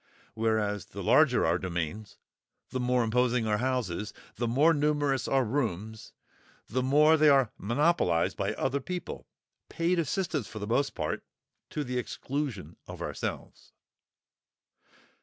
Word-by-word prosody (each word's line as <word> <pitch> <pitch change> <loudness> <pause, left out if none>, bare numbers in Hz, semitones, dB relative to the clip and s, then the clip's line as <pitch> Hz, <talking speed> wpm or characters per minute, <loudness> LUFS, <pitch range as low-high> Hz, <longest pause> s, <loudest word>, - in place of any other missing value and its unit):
Whereas 110 -2 0
the - - -7
larger - - +4
our 85 +2 +2
domains, 90 +3 -4 0.5
the 130 - -2
more 125 0 +2
imposing 120 +1 +1
our 105 -1 +1
houses, 120 -6 -2 0.2
the 120 +2 -1
more 145 +8 +4
numerous 145 -3 +1
our 135 -2 +2
rooms, 110 -4 -3 0.6
the 130 +4 -1
more 150 +5 +5
they 155 0 +6
are 135 -5 +4
monopolised 120 - +1
by - - -2
other 135 +2 -1
people—paid 175 +1 -4
assistants 165 - -1
for 110 - -9
the 105 - -4
most 135 +6 0
part—to 150 - -6
the 125 -2 -2
exclusion 125 - -4
of - - -7
ourselves. - - -6
125 Hz, 125 wpm, -29 LUFS, 110-145 Hz, 0.6 s, they